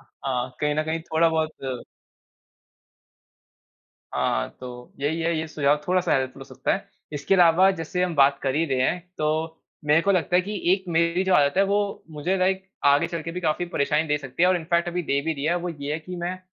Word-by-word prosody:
हाँ, 130 -2 -4
कहीं 150 0 +1
न 155 - +1
कहीं 160 +1 -2
थोड़ा 165 +1 +2
बहुत 155 -6 -3 2.3
हाँ, - - 0
तो 125 -1 -9
यही 155 +4 -1
है, 165 0 0
ये 160 - -3
सुझाव 145 -1 +2
थोड़ा-सा 185 0 +1
हेल्पफुल 130 -1 -3
हो - - -8
सकता - - -2
है। - - -7 0.2
इसके 145 +6 0
अलावा 180 +2 +6
जैसे 165 +3 -2
हम 180 -2 -1
बात 140 0 +4
कर 135 0 0
ही 165 +2 +2
रहे 130 -2 0
हैं, 180 - -2 0.2
तो 160 +1 -1 0.3
मेरे 150 +3 +4
को 200 - +1
लगता 180 0 +1
है 180 - +4
कि 205 0 -5
एक 190 0 0
मेरी 170 +2 +1
जो 190 -1 +2
आदत 145 +1 +3
है, 195 - +5
वो 200 0 -1
मुझे 155 +6 -1
लाइक 190 +1 0 0.2
आगे 140 0 +4
चल 170 -2 -5
के 165 - -5
भी 180 - -4
काफ़ी 160 +1 0
परेशानी 150 -1 0
दे 150 0 +1
सकती 135 +4 -4
है 180 - +6
और 185 - +3
इन 165 - -5
फ़ैक्ट 170 0 +2
अभी 175 0 -2
दे 140 -2 0
भी 160 - 0
रही 140 - -5
है, 170 +3 +2
वो 175 0 -3
ये 145 -3 -5
है 155 - -1
कि 180 +3 -8
मैं 175 +2 -4
160 Hz, 225 wpm, -24 LUFS, 145-180 Hz, 2.3 s, अलावा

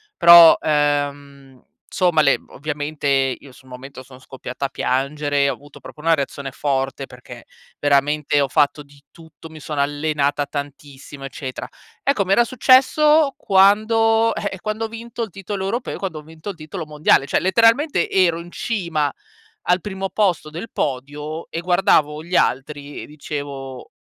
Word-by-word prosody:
però, 170 -1 +9
ehm, 145 -3 -2 0.3
somma 175 -3 +1
le 140 - +3
ovviamente 150 0 -5
io 135 -1 0
sul 130 - -19
momento, 130 +1 -10
sono 130 0 -15
scoppiata 130 +1 -7
a - - -3
piangere, 140 +2 -1
ho - - -1
avuto 145 0 -15
proprio 150 - -12
una 165 +1 +3
reazione 140 -1 -5
forte, 135 0 -2
perché 125 -1 -13 0.3
veramente 145 +1 +1
ho 140 - 0
fatto 145 +1 +1
di 140 0 -21
tutto, 160 0 -14
mi 155 -1 -12
sono 150 -1 -5
allenata 145 0 -1
tantissimo 140 -1 -8
eccetera. 130 -1 -6 0.4
Ecco, 265 -8 +1
mi 190 - +2
era 240 - +5
successo 275 +5 +4
quando 225 +3 +3
eh, 205 - -3
eh, 190 - -8
quando 215 +2 -3
ho - - -4
vinto 230 +1 -6
il 220 - -5
titolo 195 +1 -6
europeo, 235 +5 -3
quando 180 -6 -5
ho 150 - -13
vinto 160 +5 -10
il 190 - -7
titolo 160 +2 -7
mondiale, 150 -2 +2
cioè - - +1
letteralmente 230 - +2
ero 180 -3 +2
in 175 +1 -13
cima 170 -11 -2 0.5
al 180 +1 +2
primo 195 -1 -5
posto 180 -7 0
del 170 +9 -8
podio, 150 +4 -4
e 165 - -4
guardavo 165 -4 +2
gli 180 +2 -4
altri, 145 +1 -1
e - - -8
dicevo: 140 -3 -7
150 Hz, 160 wpm, -20 LUFS, 140-190 Hz, 0.5 s, però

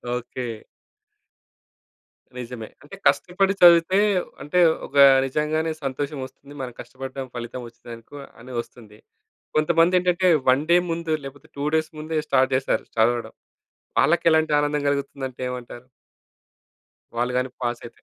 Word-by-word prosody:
Okay. 125 +1 -5 1.9
నిజమే. 115 -3 -7
అంటే, 150 +7 -11
కష్టపడి 195 +2 +2
చదివితే 175 +2 +7 0.4
అంటే, 165 +5 0 0.3
ఒక 145 - -16 0.3
నిజంగానే 155 +3 -1
సంతోషమొస్తుంది. 140 0 -5
మనం 125 -2 -6
కష్టపడ్డాం, 135 0 -7
ఫలితవొచ్చిందనుకో 120 +1 -9 0.2
అని 125 +1 -10
ఒస్తుంది. 110 -3 -17 0.6
కొంతమందేంటంటే, 175 +3 +3 0.2
1 135 +3 +4
డే 175 - +7
ముందు, 165 -1 -2
లేపోతే 145 +3 -11
2 140 - -2
డేస్ 155 -1 0
ముందే 155 +1 -3
స్టార్ట్ 130 0 +2
చేస్తారు 135 +1 0
చదవడం. 115 0 +1 0.7
వాళ్ళకేలాంటి 160 -2 +3
ఆనందం 145 0 0
గలుగుతుందంటే 140 -2 -3
ఏమంటారు? 125 0 -8 1.3
వాళ్ళు 125 +1 0
గానీ 125 0 0
పాసయితే? 120 -1 -5
140 Hz, 105 wpm, -23 LUFS, 125-160 Hz, 1.9 s, చదివితే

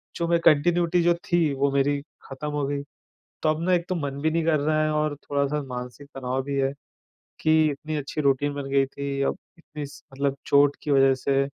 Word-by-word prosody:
जो 170 - -1
मैं 170 0 +3
कंटीन्युइटी 170 +3 +4
जो 175 - +4
थी 165 -5 +2
वो 140 +1 +1
मेरी 140 +1 +1 0.3
ख़त्म 135 +3 -5
हो 145 -1 -1
गई। 140 0 -2 0.6
तो 155 - +2
अब 155 0 +1
ना 185 - +2
एक 170 0 0
तो 185 - 0
मन 140 -4 -3
भी 160 - +2
नहीं 165 0 0
कर 155 -2 +2
रहा 155 +1 +1
है 155 - +1
और 150 -1 0
थोड़ा-सा 145 +1 -1
मानसिक 125 +2 -7
तनाव 130 0 -2
भी 140 +1 -4
है, 135 0 +1 0.7
कि 155 -1 +4
इतनी 155 +2 -4
अच्छी 145 +2 -4
रूटीन 140 0 +2
बन 140 -1 -5
गई 135 -1 +3
थी, 140 0 -4
अब 140 - 0 0.2
इतनी 150 -3 -7
स, 140 0 -13
मतलब 140 0 -1
चोट 140 0 +4
की 150 - -4
वज़ह 135 -1 +5
से, 135 +1 +1
145 Hz, 220 wpm, -25 LUFS, 140-155 Hz, 0.7 s, वज़ह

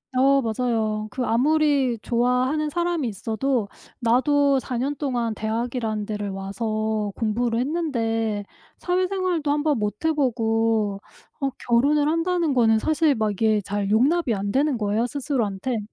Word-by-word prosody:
어 275 +2 +4
맞아요. 220 -2 -1
그 255 -1 -2
아무리 275 0 +2
좋아하는 250 +6 +1
사람이 340 -5 -1
있어도 225 +3 -1 0.3
나도 275 +4 +3
4 255 -1 -4
년 275 +4 -1
동안 245 -6 -2
대학이라는 220 -1 -2
데를 210 -1 -4
와서 215 +2 -2
공부를 230 +1 0
했는데 225 -8 -1 0.3
사회생활도 360 -4 0
한번 295 -1 +1
못 210 +6 -3
해 320 - +3
보고 225 -6 0 0.4
어 275 - +1 0.2
결혼을 285 +5 +3
한다는 330 -1 +1
거는 225 -3 +4
사실 310 +2 +2
막 215 -2 0
이게 215 +1 +2
잘 200 0 -3
용납이 265 +5 +2
안 200 0 -2
되는 280 +1 +1
거예요 215 +2 0
스스로한테. 245 -5 -2
240 Hz, 295 characters per minute, -23 LUFS, 220-290 Hz, 0.4 s, 어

